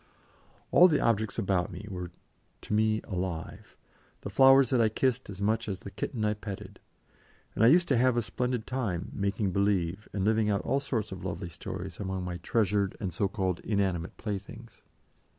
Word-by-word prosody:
All 180 Hz, -, +8 dB
the 150 Hz, -5 st, +2 dB
objects 110 Hz, -3 st, +1 dB
about 95 Hz, -2 st, 0 dB
me 105 Hz, -, -8 dB
were 90 Hz, -3 st, -5 dB, 0.5 s
to -, -, -5 dB
me 110 Hz, 0 st, +2 dB
alive, 90 Hz, -3 st, -5 dB, 0.4 s
the 100 Hz, -, -6 dB
flowers 135 Hz, +2 st, +6 dB
that 125 Hz, -3 st, +4 dB
I 110 Hz, -, +4 dB
kissed 130 Hz, +2 st, 0 dB
as 100 Hz, -1 st, -8 dB
much 110 Hz, +2 st, 0 dB
as 95 Hz, -2 st, -4 dB
the 100 Hz, -, -8 dB
kitten 110 Hz, 0 st, -3 dB
I 105 Hz, -, +2 dB
petted, 105 Hz, -2 st, -8 dB, 0.7 s
and -, -, +1 dB
I -, -, +8 dB
used 170 Hz, +6 st, +5 dB
to 135 Hz, -, +3 dB
have 125 Hz, 0 st, +3 dB
a 120 Hz, -, +2 dB
splendid 125 Hz, -1 st, -2 dB
time 105 Hz, -9 st, -3 dB
"making 100 Hz, 0 st, -1 dB
believe" 100 Hz, 0 st, 0 dB
and 95 Hz, -2 st, -1 dB
living 110 Hz, 0 st, +2 dB
out 100 Hz, -1 st, +1 dB
all 135 Hz, +2 st, 0 dB
sorts 115 Hz, -7 st, -3 dB
of 95 Hz, -2 st, -7 dB
lovely 90 Hz, -1 st, -4 dB
stories 90 Hz, +2 st, -7 dB
among 95 Hz, -2 st, -3 dB
my 90 Hz, -1 st, -4 dB
treasured 100 Hz, -1 st, 0 dB
and 95 Hz, -5 st, -3 dB
so 100 Hz, +4 st, +1 dB
called 95 Hz, -2 st, -2 dB
inanimate 95 Hz, -5 st, -1 dB
playthings. 110 Hz, +2 st, -7 dB
105 Hz, 185 wpm, -29 LUFS, 95-115 Hz, 0.7 s, All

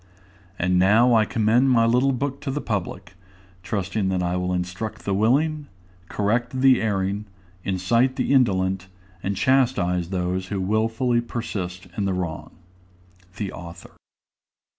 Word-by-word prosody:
And 90 Hz, 0 st, +1 dB
now 110 Hz, +6 st, +5 dB
I 110 Hz, -2 st, +4 dB
commend 115 Hz, +4 st, +2 dB
my 115 Hz, -3 st, +4 dB
little 125 Hz, +4 st, +3 dB
book 135 Hz, +2 st, -3 dB
to 145 Hz, -, -4 dB
the 140 Hz, +2 st, -2 dB
public, 95 Hz, -5 st, -4 dB, 0.5 s
trusting 95 Hz, +1 st, -2 dB
that 90 Hz, -1 st, 0 dB
it 90 Hz, +1 st, -1 dB
will 90 Hz, 0 st, -1 dB
instruct 90 Hz, +4 st, -4 dB
the 100 Hz, -, 0 dB
willing, 145 Hz, +9 st, +1 dB, 0.4 s
correct 120 Hz, +5 st, -1 dB
the 130 Hz, -1 st, +5 dB
erring, 100 Hz, -1 st, -1 dB, 0.4 s
incite 115 Hz, +8 st, +1 dB
the 135 Hz, -, 0 dB
indolent, 95 Hz, -7 st, +2 dB, 0.3 s
and 100 Hz, 0 st, -2 dB
chastise 105 Hz, -10 st, +2 dB
those 90 Hz, 0 st, -2 dB
who 100 Hz, -1 st, -3 dB
wilfully 115 Hz, +5 st, +1 dB
persist 95 Hz, -7 st, -5 dB
in 100 Hz, -, -1 dB
the 95 Hz, -, 0 dB
wrong. 90 Hz, -4 st, -4 dB, 0.9 s
THE 100 Hz, -2 st, -3 dB
AUTHOR. 85 Hz, 0 st, -10 dB
105 Hz, 140 wpm, -23 LUFS, 95-120 Hz, 0.9 s, now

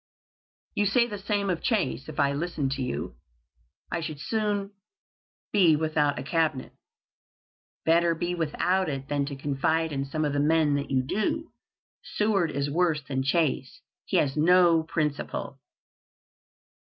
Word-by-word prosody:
"You 205 Hz, -, +1 dB
say 235 Hz, +4 st, +4 dB
the 210 Hz, -4 st, -6 dB
same 200 Hz, 0 st, 0 dB
of 170 Hz, -, -2 dB
Chase. 185 Hz, -, -1 dB
If 155 Hz, 0 st, -7 dB
I 140 Hz, -1 st, +3 dB
listened 145 Hz, -3 st, -2 dB
to 135 Hz, 0 st, -2 dB
you, 70 Hz, -, -4 dB, 0.7 s
I 170 Hz, -, -1 dB
should 155 Hz, -3 st, -5 dB
soon 205 Hz, +1 st, -1 dB, 0.8 s
be 180 Hz, -7 st, +5 dB
without 150 Hz, -2 st, +1 dB
a 130 Hz, -, -4 dB
Cabinet." 155 Hz, -3 st, 0 dB, 1.1 s
"Better 170 Hz, +1 st, +3 dB
be 175 Hz, +2 st, -2 dB
without 175 Hz, +2 st, 0 dB
it 135 Hz, -1 st, -5 dB
than 145 Hz, -1 st, 0 dB
to 140 Hz, -, -5 dB
confide 145 Hz, +4 st, 0 dB
in 140 Hz, -1 st, -2 dB
some 155 Hz, +3 st, -2 dB
of 145 Hz, -, -1 dB
the 145 Hz, -, 0 dB
men 155 Hz, 0 st, +3 dB
that 145 Hz, 0 st, -2 dB
you 130 Hz, -1 st, +1 dB
do. 215 Hz, -, -2 dB, 0.6 s
Seward 205 Hz, -5 st, +2 dB
is 140 Hz, -1 st, -1 dB
worse 160 Hz, 0 st, +1 dB
than 135 Hz, -1 st, -2 dB
Chase. 140 Hz, -2 st, 0 dB, 0.2 s
He -, -, 0 dB
has 135 Hz, -2 st, +1 dB
no 170 Hz, +1 st, +5 dB
principle." 150 Hz, -3 st, -3 dB
155 Hz, 150 wpm, -27 LUFS, 140-180 Hz, 1.1 s, be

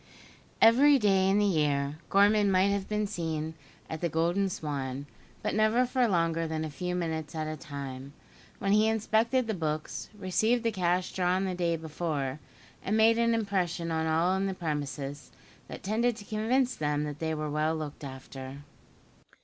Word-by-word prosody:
Every 275 Hz, +6 st, +7 dB
day 195 Hz, -5 st, +3 dB
in 195 Hz, -, +3 dB
the 210 Hz, -, +3 dB
year, 150 Hz, -5 st, +1 dB
Gorman 205 Hz, +1 st, +4 dB
might 190 Hz, +1 st, +4 dB
have 200 Hz, -1 st, -1 dB
been 210 Hz, 0 st, 0 dB
seen 160 Hz, -5 st, -3 dB, 0.3 s
at 160 Hz, -, -6 dB
the 170 Hz, -, 0 dB
"Golden 175 Hz, +5 st, +1 dB
Swan"; 140 Hz, -5 st, -4 dB, 0.4 s
but -, -, -1 dB
never 215 Hz, +4 st, +3 dB
for 250 Hz, -1 st, +2 dB
longer 165 Hz, -4 st, +1 dB
than 160 Hz, 0 st, -2 dB
a 155 Hz, -, -6 dB
few 180 Hz, +4 st, -3 dB
minutes 160 Hz, -3 st, -3 dB
at 155 Hz, -1 st, -2 dB
a 155 Hz, 0 st, -4 dB
time, 140 Hz, -2 st, -7 dB, 0.4 s
when 195 Hz, -, -1 dB
he 215 Hz, +1 st, +5 dB
inspected 225 Hz, +3 st, +2 dB
the 220 Hz, -, -2 dB
books, 155 Hz, -4 st, -3 dB
received 220 Hz, +5 st, +1 dB
the 230 Hz, -, +1 dB
cash 180 Hz, -2 st, 0 dB
drawn 185 Hz, +1 st, +1 dB
the 185 Hz, -, -1 dB
day 170 Hz, -2 st, 0 dB
before; 155 Hz, -4 st, -3 dB, 0.4 s
and 210 Hz, +3 st, 0 dB
made 225 Hz, +1 st, +5 dB
an 230 Hz, 0 st, +3 dB
impression 185 Hz, -6 st, -1 dB
on 160 Hz, 0 st, 0 dB
all 165 Hz, +4 st, +2 dB
in 195 Hz, +1 st, 0 dB
the 190 Hz, -, -3 dB
premises, 145 Hz, -4 st, -4 dB, 0.4 s
that -, -, -9 dB
tended 230 Hz, +4 st, +1 dB
to 210 Hz, -2 st, -11 dB
convince 245 Hz, +5 st, +1 dB
them 150 Hz, -1 st, -1 dB
they 160 Hz, -1 st, -1 dB
were 155 Hz, -1 st, -3 dB
well 155 Hz, +2 st, +1 dB
looked 150 Hz, -2 st, -6 dB
after. 135 Hz, 0 st, -8 dB
175 Hz, 175 wpm, -29 LUFS, 155-210 Hz, 0.4 s, Every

